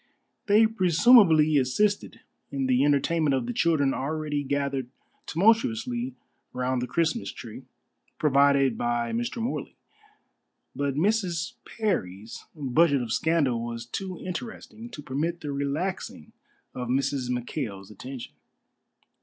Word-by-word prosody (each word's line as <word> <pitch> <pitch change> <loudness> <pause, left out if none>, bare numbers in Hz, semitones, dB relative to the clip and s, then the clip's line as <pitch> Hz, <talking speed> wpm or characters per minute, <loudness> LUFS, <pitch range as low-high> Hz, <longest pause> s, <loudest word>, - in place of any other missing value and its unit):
They 215 +2 +6
presumably 180 - +5
assisted 200 +11 0 0.3
in 135 -1 -2
the 130 +1 +3
entertainment 145 +1 +2
of 130 -3 -1
the 120 - -3
children 145 -4 +2
already 150 +1 -2
gathered 140 -2 -2 0.4
tumultuously 125 - +1 0.4
round 125 0 -1
the 125 - -2
Christmas 155 - 0
tree, - - -10 0.5
provided 140 -3 +3
by 120 -1 0
Mr. 120 - -2
Morley; 230 +3 -4 1.0
but 140 -1 -1
Mrs. 180 -1 0
Parry's 110 - -3
budget 145 -1 +2
of 115 -2 -3
scandal 145 -8 +1
was 115 0 -5
too 185 +8 -5
interesting 220 +4 -7
to 150 - -9
permit 160 +6 -2
the 145 - -4
relaxing 140 - -3 0.4
of 125 -1 -5
Mrs. 130 0 0
McKail's 120 -5 -4
attention. 125 +4 -8
140 Hz, 115 wpm, -26 LUFS, 125-170 Hz, 1.0 s, They